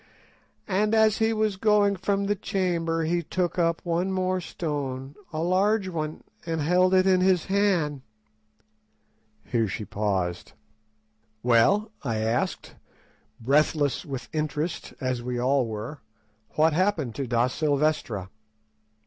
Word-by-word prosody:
And 210 +2 +1
as 220 -1 +4
he 220 0 +3
was 215 -3 0
going 205 -1 +3
from 195 +2 -1
the 205 +1 0
chamber 170 -4 -1
he 170 +2 0
took 180 +2 -2
up 165 -1 +1
one 175 +2 0
more 185 0 0
stone, 140 -5 -4 0.2
a 160 0 -2
large 190 +3 +2
one, 155 -3 -4 0.2
and 165 -1 -2
held 180 +4 +3
it 185 0 +4
in 185 -1 +4
his 185 -2 +3
hand." 185 -8 +1 1.4
Here 115 -3 0
she 105 +2 -5
paused. 95 -4 -2 0.9
"Well," 125 - +3
I 115 -5 -2
asked, 110 +2 -1 0.7
breathless 145 +3 +2
with 135 -3 -6
interest 155 +2 -2
as 130 -2 -2
we 125 0 -3
all 130 0 +2
were, 110 +7 -6 0.6
"what 155 +1 +4
happened 165 - 0
to 135 +1 -4
Da 120 0 +2
Silvestra?" 140 - -1
160 Hz, 130 wpm, -26 LUFS, 130-185 Hz, 1.4 s, as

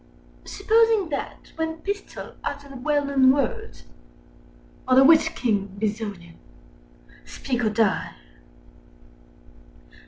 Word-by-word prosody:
Supposing 440 -2 +2
that, 285 - -6
when 320 0 -3
Pistol 405 0 -6
uttered 285 -1 -6
the - - -10
well 290 +2 0
known 270 -2 +4
words— 270 -3 -3 1.0
"Under 260 +1 +6
which 315 +2 +5
king, 205 -4 -2
Bezonian? 205 -5 -4 0.9
Speak 245 -3 -4
or 220 - +2
die!" 210 -3 0
270 Hz, 95 wpm, -24 LUFS, 220-320 Hz, 1.0 s, Under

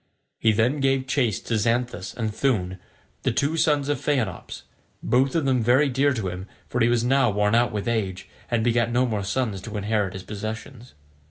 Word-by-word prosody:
He 110 - +4
then 120 +7 +1
gave 135 -1 +1
chase 125 -4 0
to 115 -2 -1
Xanthus 115 -4 -1
and 110 -3 -2
Thoon, 95 -9 0 0.4
the - - +1
two 145 +3 0
sons 150 -3 +2
of 145 - -1
Phaenops, 130 - -2 0.4
both 130 +3 +2
of 160 -4 +1
them 130 -2 +2
very 130 +6 +4
dear 135 +3 +2
to 110 -7 -2
him, 90 +2 -7 0.2
for 125 - -2
he 115 - +5
was 120 -1 +2
now 130 0 +3
worn 105 +1 +1
out 120 +1 +3
with 105 +1 -4
age, 100 -5 -2 0.2
and 115 -2 +1
begat 120 0 +2
no 125 +2 +2
more 110 -5 -2
sons 100 -1 -2
to 105 +2 -6
inherit 105 -2 -1
his 95 -1 -7
possessions. 110 - -7
120 Hz, 195 wpm, -24 LUFS, 105-130 Hz, 0.4 s, he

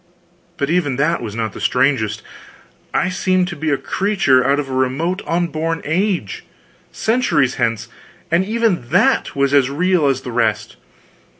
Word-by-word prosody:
But 140 +2 -1
even 165 -7 +1
that 150 +6 0
was 110 -3 -6
not 110 -3 -3
the - - -9
strangest. 125 -5 +1 0.7
I 185 - +1
seemed 185 0 +1
to 175 - -6
be 155 0 -2
a 140 - +2
creature 190 -11 +1
out 140 +3 +2
of 145 - -3
a 135 - -6
remote 135 +9 -1
unborn 165 -1 -1
age, 175 - -1 0.5
centuries 165 - +1
hence, 115 -2 0 0.4
and 170 +2 +3
even 210 - -1
that 215 - +2
was 140 0 +1
as 135 -2 +4
real 175 +1 +1
as 135 -1 0
the 125 - -7
rest! 110 -3 -1
145 Hz, 160 wpm, -18 LUFS, 130-180 Hz, 0.7 s, as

